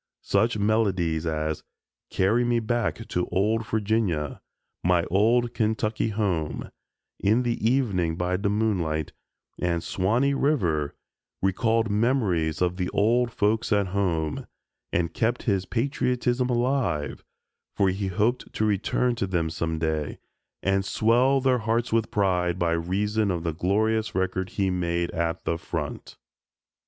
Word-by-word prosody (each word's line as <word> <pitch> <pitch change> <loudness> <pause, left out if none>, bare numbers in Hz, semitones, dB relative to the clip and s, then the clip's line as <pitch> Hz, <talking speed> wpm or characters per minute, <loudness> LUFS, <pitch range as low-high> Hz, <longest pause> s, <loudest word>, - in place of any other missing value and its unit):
Such 110 +3 +2
melodies 95 -7 +1
as 80 -1 -2 0.5
"Carry 105 +6 +2
Me 120 -1 +2
Back 115 0 -1
to 90 - -1
Old 110 +4 +1
Virginia," 105 -9 0 0.4
"My 90 -1 +3
Old 115 +5 +3
Kentucky 110 0 0
Home," 90 -8 -2 0.5
"In 110 +5 +3
the 120 -2 -2
Evening 105 -9 +1
by 90 +1 -1
de 100 +2 0
Moonlight," 90 -8 0 0.5
and 85 -1 0
"Swanee 115 +11 +1
River" 90 - +1 0.5
recalled 110 +3 +1
memories 100 - +1
of 90 0 0
the 90 -1 -1
"old 120 +3 +2
folks 110 +2 0
at 100 -2 +2
home," 85 -6 -1 0.4
and 85 -1 0
kept 120 +2 0
his 95 -4 0
patriotism 125 0 0
alive, 120 - 0 0.5
for 100 -1 +3
he 95 +1 -2
hoped 110 +7 0
to 110 - 0
return 110 +4 +1
to 105 -4 -2
them 85 -3 -1
some 80 0 -2
day 80 -2 -2 0.5
and 95 0 +2
swell 120 +7 +3
their 130 -1 +2
hearts 115 +2 0
with 115 -1 +2
pride 90 -3 +1
by 85 -2 +1
reason 100 +6 0
of 85 -3 -2
the 85 -2 -1
glorious 110 +6 0
record 95 0 -1
he 95 0 0
made 85 -1 -1
at 85 +1 -2
the 85 0 -1
front. - - -5
100 Hz, 135 wpm, -26 LUFS, 85-115 Hz, 0.5 s, My